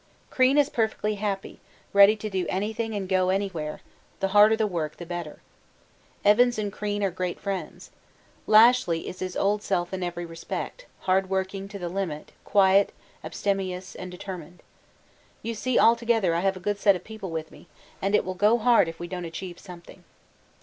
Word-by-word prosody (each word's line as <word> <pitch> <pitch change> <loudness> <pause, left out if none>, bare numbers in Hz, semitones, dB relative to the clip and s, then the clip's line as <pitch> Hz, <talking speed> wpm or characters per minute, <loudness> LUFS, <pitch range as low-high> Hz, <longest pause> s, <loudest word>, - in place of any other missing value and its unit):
'Crean 260 +1 +3
is 290 -2 +5
perfectly 220 -4 -1
happy, 200 -2 -4 0.3
ready 200 +2 +7
to 215 0 -6
do 190 -4 -2
anything 220 +3 -2
and 195 -2 -3
go 185 -1 +2
anywhere, 185 -6 -2 0.4
the 195 - 0
harder 210 +2 +6
the 220 - +1
work, 165 -6 -3
the 175 - -8
better. 175 -3 -6 0.8
Evans 240 +4 +5
and 205 -2 -3
Crean 205 -1 -3
are 195 - +1
great 180 0 -4
friends. 185 -2 -5 0.6
Lashly 215 -6 +5
is 185 - -7
his 185 -1 -4
old 205 +1 +1
self 180 -3 -1
in 190 - -3
every 175 -1 -4
respect, 165 - -6
hard 190 0 +1
working 190 +1 -2
to 200 0 -8
the 180 -3 -4
limit, 170 -4 -4
quiet, 195 0 +4 0.3
abstemious, 190 -2 -3
and 185 - -8
determined. 180 -2 -9 0.8
You 230 - -3
see 245 +3 -1
altogether 230 -5 +3
I 165 - +1
have 190 +1 0
a - - -8
good 205 +2 -2
set 200 -1 +5
of 180 - -7
people 220 -4 -8
with 160 -1 -5
me, - - -16 0.3
and 195 +2 +1
it - - +2
will 185 - -3
go 210 +5 +3
hard 235 -5 +4
if 165 0 -7
we 175 - -5
don't 180 0 -5
achieve 175 +2 -7
something. 175 -3 -13
195 Hz, 180 wpm, -26 LUFS, 180-210 Hz, 0.8 s, ready